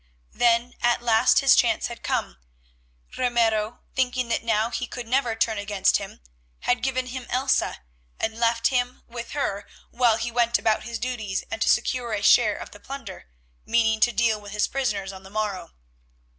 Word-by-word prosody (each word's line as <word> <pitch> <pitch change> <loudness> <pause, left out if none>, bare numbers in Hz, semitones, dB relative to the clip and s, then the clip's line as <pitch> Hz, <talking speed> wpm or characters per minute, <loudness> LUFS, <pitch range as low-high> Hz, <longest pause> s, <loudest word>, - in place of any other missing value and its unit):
Then 240 +1 +2
at 240 0 +2
last 235 +1 +4
his 275 -1 +6
chance 230 -3 +2
had 235 -1 -6
come. - - -2 0.8
Ramiro, 230 -3 +1
thinking 255 -1 0
that 230 - 0
now 225 0 +1
he 245 - -3
could 245 0 -7
never 245 -2 +1
turn 225 -1 0
against 205 -1 +2
him, - - -9 0.4
had 245 0 +1
given 255 -1 -1
him 255 -1 -7
Elsa, 255 - 0 0.4
and 220 +1 -2
left 230 -1 +2
him 250 -1 -1
with 235 0 -8
her 205 -8 -2 0.2
while 235 -2 +3
he 230 +1 -3
went 235 0 +2
about 215 -1 0
his 235 -1 -4
duties 220 -6 -3
and 335 - -4
to - - +3
secure 245 -3 +1
a 205 -1 -2
share 210 +1 +5
of - - -9
the 205 - -13
plunder, 230 - -9 0.4
meaning 225 -1 +2
to 240 - +4
deal 220 -1 +1
with 205 0 -10
his 210 - +1
prisoners 205 -8 -2
on 190 - -10
the 190 - -13
morrow. 210 -2 -3
235 Hz, 180 wpm, -24 LUFS, 215-245 Hz, 0.8 s, his